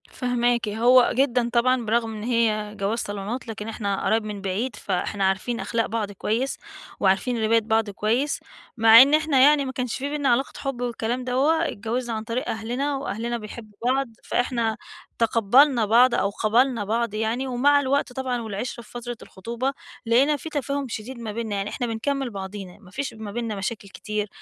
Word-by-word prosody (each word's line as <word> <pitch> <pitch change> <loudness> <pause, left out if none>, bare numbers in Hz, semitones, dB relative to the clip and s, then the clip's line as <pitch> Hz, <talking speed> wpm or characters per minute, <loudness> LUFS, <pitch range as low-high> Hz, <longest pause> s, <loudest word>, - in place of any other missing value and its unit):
فاهماكِ، 245 -2 0
هو 240 +4 +5
جدًا 245 -2 +2
طبعًا 250 0 +2
برغم 225 0 0
إن 210 - -6
هي 215 -3 0
جواز 205 +3 -1
صالونات 205 +5 -4
لكن 215 -1 -6
إحنا 205 -3 -2
قرايب 220 0 +2
من 210 -2 -6
بعيد، 205 +5 -2
فإحنا 195 +1 -2
عارفين 195 +5 0
أخلاق 230 -1 -1
بعض 220 -3 -3
كويس، 225 +7 -2 0.4
وعارفين 220 +5 +1
رباية 225 +1 +4
بعض 220 0 +1
كويس، 230 +8 0 0.4
مع 225 +1 +9
إن 280 +3 +5
إحنا 310 -3 +3
يعني 285 +1 +5
ما 260 - -3
كانش 250 -3 -3
في 275 +2 -3
بيننا 290 -2 0
علاقة 245 +3 +1
حب 275 -3 -4
والكلام 240 +1 -2
دوّة، 290 +7 +2
اتجوزنا 230 +3 -3
عن 220 - -4
طريق 235 +5 -3
أهلنا، 245 +6 -2
وأهلنا 235 -3 -3
بيحبوا 215 -1 -10
بعض، 265 +2 +2 0.2
فإحنا 235 -3 0 0.4
تقبّلنا 235 +3 +4
بعض 240 +3 +5
أو 200 - +1
قبلنا 230 +3 +2
بعض 230 +1 -1
يعني، 225 +5 -1
ومع 275 +3 +3
الوقت 280 -1 0
طبعًا 255 -2 -2
والعِشرة 225 +2 -5
في - - -18
فترة 240 0 -6
الخطوبة 235 +7 -4 0.3
لقينا 265 +6 +3
في 320 - -7
تفاهم 280 -1 -2
شديد 240 +2 -6
ما 225 -2 -5
بيننا، 220 -1 -3
يعني 200 +1 -2
إحنا 245 - -3
بنكمل 265 +4 -2
بعضينا، 195 -2 -7
ما 185 -4 -17
فيش 270 +2 -4
ما 220 -2 -7
بيننا 230 -1 -3
مشاكل 200 +1 -4
كتير 210 +1 -4
235 Hz, 175 wpm, -24 LUFS, 215-255 Hz, 0.4 s, مع